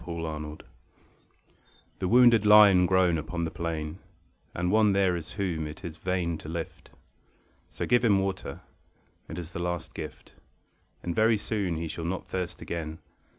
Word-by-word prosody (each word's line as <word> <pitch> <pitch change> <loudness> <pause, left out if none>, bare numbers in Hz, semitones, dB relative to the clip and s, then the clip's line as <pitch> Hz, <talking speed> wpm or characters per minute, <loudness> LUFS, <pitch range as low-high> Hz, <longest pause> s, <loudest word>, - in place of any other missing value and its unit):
THE 85 - -7
WOUNDED 75 -2 -5 1.4
The 95 - -1
wounded 120 -1 +6
lie 105 0 +9
and 90 -2 +4
groan 90 -3 +3
upon 85 +2 -3
the 80 - -4
plain; 80 0 -4 0.6
And 90 +1 0
one 105 -1 +4
there 95 -2 +2
is 85 -2 -6
whom 85 -6 -2
it 75 +5 -9
is 80 -2 -6
vain 90 -3 -2
to 75 - -9
lift; 85 0 -6 0.8
So - - -4
give 120 0 +3
him 105 -4 +4
water. 95 -7 -3 0.7
It 80 - -6
is 85 -1 -7
the - - -4
last 85 -1 -3
gift, - - -8 0.7
And 85 -1 -3
very 110 0 +4
soon 100 -4 -2
he 80 +1 -3
shall 80 +1 -5
not 90 +2 -3
thirst 90 -2 -4
again. 80 -2 -5
85 Hz, 165 wpm, -28 LUFS, 80-100 Hz, 1.4 s, lie